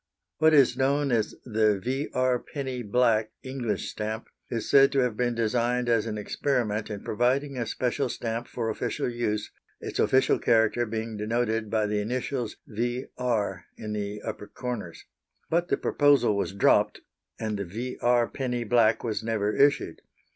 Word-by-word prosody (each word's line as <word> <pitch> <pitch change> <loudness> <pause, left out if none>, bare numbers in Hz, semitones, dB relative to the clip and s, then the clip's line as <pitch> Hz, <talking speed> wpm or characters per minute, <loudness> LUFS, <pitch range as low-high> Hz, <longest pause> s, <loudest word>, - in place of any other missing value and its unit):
What 160 0 +5
is 135 -3 +5
known 140 +1 +1
as 110 -3 0
the 110 -3 +2
V.R. 130 +2 0
Penny 130 -3 -5
black, 110 -1 +2
English 125 -6 -3
stamp, 110 +1 -4 0.2
is 115 -2 -3
said 135 0 +6
to 135 - +3
have 125 -4 0
been 120 +1 0
designed 120 +2 0
as 115 -1 +2
an 105 -1 -3
experiment 110 -1 -1
in 105 -2 -6
providing 130 +5 0
a 120 -3 -2
special 130 +1 -1
stamp 115 0 -3
for 115 -2 -3
official - - -2
use, 115 -3 -2 0.3
its - - -5
official 130 0 +3
character 115 +1 +3
being 110 0 -4
denoted 110 0 -1
by 110 0 +1
the 105 0 0
initials 125 +1 -3
V.R. 120 -1 -2
in 105 -1 -5
the 105 0 -4
upper 105 - -5
corners; 120 -10 -6 0.5
but 170 +2 +2
the - - +1
proposal 145 -7 +3
was 100 - -1
dropped, 100 0 +3 0.4
and 110 -2 -2
the 100 - -2
V.R. 120 +4 0
Penny 125 -3 -3
black 115 -1 +3
was 110 -4 -2
never 105 -2 0
issued. 140 0 +2
120 Hz, 155 wpm, -27 LUFS, 110-125 Hz, 0.5 s, said